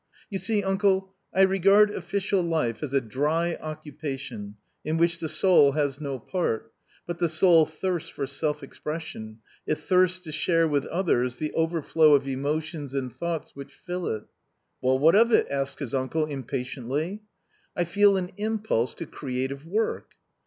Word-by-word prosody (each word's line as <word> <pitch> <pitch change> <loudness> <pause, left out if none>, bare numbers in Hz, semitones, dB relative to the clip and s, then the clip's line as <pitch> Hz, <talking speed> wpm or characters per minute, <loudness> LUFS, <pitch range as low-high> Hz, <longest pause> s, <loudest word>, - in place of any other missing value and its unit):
" - - -27
You 195 - -2
see, 215 -1 0
uncle, 195 0 +1 0.2
I 190 - +4
regard 195 +2 +5
official 195 +1 -1
life 160 -10 -1
as 150 -4 -4
a 140 - +3
dry 150 +8 0
occupa 150 -2 -5
tion, 105 -6 -8 0.3
in 155 +2 -1
which 170 0 +2
the 160 - -3
soul 150 -7 +5
has 145 -1 -1
no 140 -2 -3
part, 115 - -2 0.3
but 175 -1 -5
the 170 -2 +2
soul 160 0 +5
thirsts 175 +2 -3
for 140 - -4
self 150 +2 -2
expression, 115 -9 -7 0.3
it 155 - +1
thirsts 185 -1 +2
to 160 -4 -8
share 165 +1 +2
with 145 -3 0
others 125 -9 0
the 155 +3 -3
overflow 160 -2 +3
of 140 -1 0
emotions 145 +1 -3
and 130 -3 -2
thoughts 165 +4 -4
which 140 0 -10
fill 180 0 -4
it" 110 -1 -3 0.3
" - - -50
Well, 130 +1 +3
what 155 +5 +5
of 230 +4 +5
it? - - +5
" - - -11
asked 140 0 -2
his 140 -6 -6
uncle 135 +4 0
impatiently. 140 - -4 0.2
\ 425 - -41
" 395 - -40
I 175 - +3
feel 200 +3 +4
an 180 -1 -3
impulse 215 - -1
to 170 - -6
creative 135 +1 -4
work." 215 +6 -2
155 Hz, 180 wpm, -26 LUFS, 135-180 Hz, 0.3 s, regard